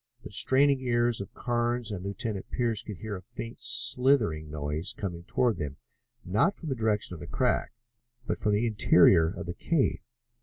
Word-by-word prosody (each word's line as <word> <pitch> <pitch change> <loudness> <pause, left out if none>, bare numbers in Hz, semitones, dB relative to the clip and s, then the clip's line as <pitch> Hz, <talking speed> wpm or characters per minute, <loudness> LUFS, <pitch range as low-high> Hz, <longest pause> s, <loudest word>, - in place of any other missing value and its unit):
The - - -9
straining 140 +1 +4
ears 120 -3 +1
of 100 - -8
Carnes 120 -1 -1
and 95 -3 -5
Lieutenant 100 0 -4
Pearce 115 -4 0
could 105 -5 -8
hear 110 +1 -5
a - - -10
faint 115 +6 -8
slithering 120 - +2
noise 75 +4 -2
coming 85 -4 -5
toward 120 +2 +1
them, 70 -2 -5 0.5
not 105 - +2
from 165 - -7
the 135 - -1
direction 110 -5 0
of 85 - -8
the - - -8
crack, - - 0 0.5
but - - -2
from 105 - +1
the 105 +3 +2
interior 90 -6 +5
of 95 +3 -5
the 85 - -4
cave. 165 - 0
110 Hz, 180 wpm, -28 LUFS, 90-120 Hz, 0.5 s, interior